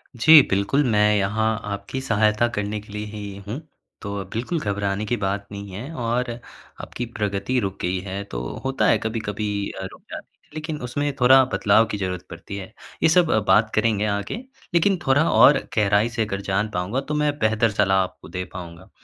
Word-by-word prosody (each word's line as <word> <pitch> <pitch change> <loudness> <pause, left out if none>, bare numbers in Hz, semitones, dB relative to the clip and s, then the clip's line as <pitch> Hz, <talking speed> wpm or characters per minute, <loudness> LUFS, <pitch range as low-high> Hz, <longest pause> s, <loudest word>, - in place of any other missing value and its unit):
जी, 150 +6 +8
बिल्कुल, 100 +9 +2
मैं 105 0 +4
यहाँ 105 +3 0 0.2
आपकी 100 +6 -4
सहायता 105 0 +2
करने 105 +1 -2
के 105 0 -14
लिए 105 0 -4
ही 105 -2 -7
हूँ। 125 +9 -4 0.4
तो 100 -1 -4
बिल्कुल 130 +9 -2
घबराने 100 -1 -2
की 120 +3 -1
बात 100 0 -2
नहीं 100 -1 -7
है 120 - -7
और 120 +1 -1 0.5
आपकी 120 - -5
प्रगति 105 +4 -1
रुक 100 -2 -3
गई 90 +1 -1
है 100 +2 -4
तो - - -3 0.2
होता 130 -6 +1
है, - - +5
कभी-कभी 110 -2 -3 0.3
अ, - - -4
रुक - - -15
जाती - - -7 0.2
है, - - -32
लेकिन 155 -1 -4
उसमें 145 +4 -2
थोड़ा 130 +1 +7
बदलाव 100 +3 +4
की 105 - -2
ज़रूरत 90 -2 -4
पड़ती 100 - -8
है। 95 -1 -7 0.4
ये - - +6
सब 175 -1 +4
अ, 110 - +4
बात 105 +3 +4
करेंगे 110 -1 +2
आगे। 100 - -3 0.3
लेकिन 185 +3 +3
थोड़ा 145 +5 +4
और 140 0 +7 0.2
गहराई 105 +1 +3
से 115 -2 -1
अगर 100 -1 -4
जान 100 +2 -1
पाऊँगा, 100 +9 -1
तो 150 - -5
मैं 150 -1 0
बेहतर 110 0 +2
सलाह 95 -1 +2
आपको 95 - -9
दे 90 0 -4
पाऊँगा। 85 0 -9
105 Hz, 190 wpm, -23 LUFS, 100-125 Hz, 0.5 s, जी